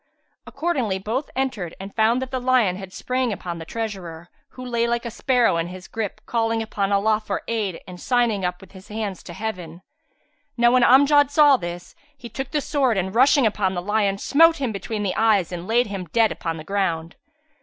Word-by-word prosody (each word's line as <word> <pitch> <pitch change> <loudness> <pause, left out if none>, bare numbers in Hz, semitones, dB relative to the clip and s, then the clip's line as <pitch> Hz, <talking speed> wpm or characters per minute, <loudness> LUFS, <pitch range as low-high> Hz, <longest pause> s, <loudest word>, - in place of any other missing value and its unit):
Accordingly 260 - -1
both 225 +9 -3
entered 245 -10 -2
and 195 +1 -8
found 230 +3 +2
that 260 - -8
the 260 -1 -2
lion 250 -7 +2
had 190 0 -9
sprang 255 +4 -2
upon 175 -4 -5
the 165 - -8
treasurer, 180 -6 -6 0.2
who 255 - -10
lay 235 -1 0
like 235 0 -1
a 235 - -4
sparrow 245 -5 +2
in 165 0 -1
his 185 +1 -10
grip, 215 -1 -5
calling 225 -1 0
upon 205 -2 -2
Allah 215 +2 +2
for 200 -2 -3
aid 210 -7 -2
and 180 -1 -11
signing 240 -6 +1 0.2
with 195 - -16
his 190 +1 -14
hands 210 -3 -4
to 175 - -10
Heaven. 180 -4 -6 0.7
Now 240 0 +4
when 255 0 +4
Amjad 285 +2 +5
saw 290 -1 +6
this, 175 -5 -6 0.2
he 245 -3 -10
took 270 +1 -5
the 300 0 -1
sword 265 -7 +1
and, 190 0 -2
rushing 265 +3 +5
upon 200 -3 0
the 175 - -2
lion, 205 -1 +1
smote 330 +9 +4
him 265 -4 -2
between 210 +1 -4
the 190 - -1
eyes 215 -6 +2
and 175 0 -6
laid 240 +2 +3
him 195 -3 -5
dead 220 +7 +1
on 165 -1 -2
the 155 - -8
ground. 170 -3 -2
220 Hz, 200 wpm, -23 LUFS, 190-250 Hz, 0.7 s, saw